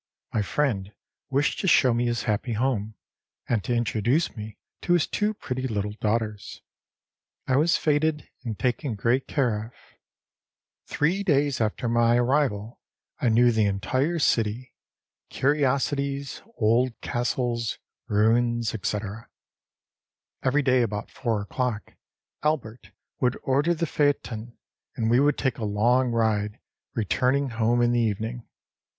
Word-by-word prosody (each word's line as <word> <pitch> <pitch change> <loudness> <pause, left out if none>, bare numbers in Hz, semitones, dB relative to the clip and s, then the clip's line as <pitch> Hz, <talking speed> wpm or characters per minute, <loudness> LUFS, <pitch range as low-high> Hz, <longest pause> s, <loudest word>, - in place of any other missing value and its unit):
My 110 - +1
friend 105 -4 -1 0.4
wished 140 +1 +1
to 190 - -1
show 130 -7 +5
me 120 +1 +1
his 120 -1 -1
happy 115 +2 -1
home, 110 -2 -1 0.5
and 115 -5 0
to 120 - 0
introduce 120 +6 +1
me 105 -1 -8 0.2
to 175 - +1
his 175 -4 +3
two 210 +1 -1
pretty 130 -8 -3
little 105 -3 -2
daughters. 105 -1 -2 0.8
I 130 - +2
was 160 +4 +3
feted 150 0 +1 0.2
and 115 -4 -4
taken 125 0 -1
great 120 +6 +1
care 115 -7 0
of. 120 - -19 1.1
Three 175 +7 +1
days 145 - +1
after 110 +2 -1
my 120 0 +3
arrival 120 -4 0 0.4
I 120 - +2
knew 120 +2 +5
the 110 -2 +2
entire 130 - 0
city, 115 -3 0 0.6
curiosities, 140 0 0 0.2
old 115 +2 +2
castles, 120 -1 -1 0.3
ruins, 115 +2 +2
etc. 105 +1 -4 1.1
Every 140 +3 +2
day 130 -2 +3
about 105 -2 -3
four 110 -5 -2
oâclock 120 -1 -3 0.5
Albert 125 -9 -2 0.3
would 125 -1 +1
order 145 +6 +2
the 170 - -1
phaeton, 120 -7 -1 0.4
and 110 0 0
we 120 - +5
would 145 +1 +3
take 130 -2 -1
a - - -4
long 120 +5 +2
ride, 110 -3 0 0.4
returning 125 +6 +1
home 115 +1 +1
in 120 - +3
the 120 - +2
evening. 110 +2 -2
120 Hz, 130 wpm, -26 LUFS, 110-135 Hz, 1.1 s, show